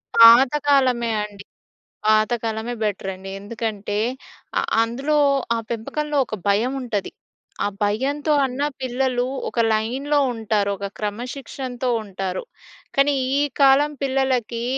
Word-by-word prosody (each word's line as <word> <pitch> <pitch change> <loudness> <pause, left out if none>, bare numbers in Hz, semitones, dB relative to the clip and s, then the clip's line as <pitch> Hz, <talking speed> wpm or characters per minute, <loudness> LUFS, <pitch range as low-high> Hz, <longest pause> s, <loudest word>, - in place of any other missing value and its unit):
పాతకాలమే 255 0 +6
అండి. 205 -1 -9 0.6
పాతకాలమే 220 +1 +1
బెటరండి. 195 -2 -3
ఎందుకంటే 210 -1 -4 0.6
ఆహ్, - - -2 0.2
అందులో 270 +6 -1 0.4
ఆ - - 0
పెంపకంలో 295 +6 -3
ఒక 215 - -5
భయముంటది. 230 0 0 0.5
ఆ - - +2 0.2
భయంతో 280 +9 0
అన్నా 270 +3 -1
పిల్లలు 255 -1 0 0.2
ఒక 235 - -4
లైన్‌లో 260 +7 0
ఉంటారు. 215 -2 0
ఒక 200 - -5
క్రమశిక్షణతో 250 +3 -4
ఉంటారు. 195 - -4 0.5
కానీ 280 +1 +4 0.3
ఈ - - +3 0.2
కాలం 275 +2 +5
పిల్లలకీ 260 -4 0
240 Hz, 100 wpm, -22 LUFS, 215-270 Hz, 0.6 s, పాతకాలమే